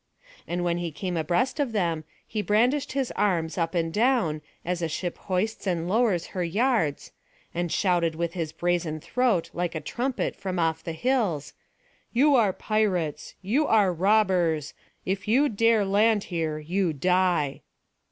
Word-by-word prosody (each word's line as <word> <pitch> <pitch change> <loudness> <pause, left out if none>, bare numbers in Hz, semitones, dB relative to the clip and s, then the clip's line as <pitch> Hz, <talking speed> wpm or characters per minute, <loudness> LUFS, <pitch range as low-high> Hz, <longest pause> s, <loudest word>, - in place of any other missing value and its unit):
And 175 +1 -2
when 175 0 0
he 170 -1 -3
came 180 +3 -4
abreast 175 - 0
of 270 -6 0
them 170 -6 0 0.2
he 215 - -3
brandished 245 +9 +1
his 270 -2 -1
arms 170 -6 0
up 165 0 -1
and 165 -1 0
down, 220 -10 +2 0.2
as 175 0 -2
a 165 - 0
ship 175 +3 -3
hoists 200 +3 -1
and 170 -2 -1
lowers 205 -4 +2
her 185 -2 -1
yards, 200 - 0 0.4
and 175 -1 -2
shouted 175 -4 +1
with 170 0 -2
his 165 -4 -3
brazen 175 -3 -1
throat 235 -1 0
like 175 -1 -2
a - - -1
trumpet 250 - -2
from 185 -2 -4
off 160 -1 0
the 165 - -4
hills: 200 - 0 0.6
"You 285 +5 +4
are 225 -7 +4
pirates, 185 -7 -1
you 260 +11 +1
are 205 -5 +4
robbers! 180 -5 +2 0.3
If 190 +1 -2
you 265 +7 +4
dare 225 -1 +3
land 205 +2 +3
here, 160 -2 -1
you 170 +3 -1
die." 175 -2 +1
180 Hz, 160 wpm, -26 LUFS, 165-220 Hz, 0.6 s, You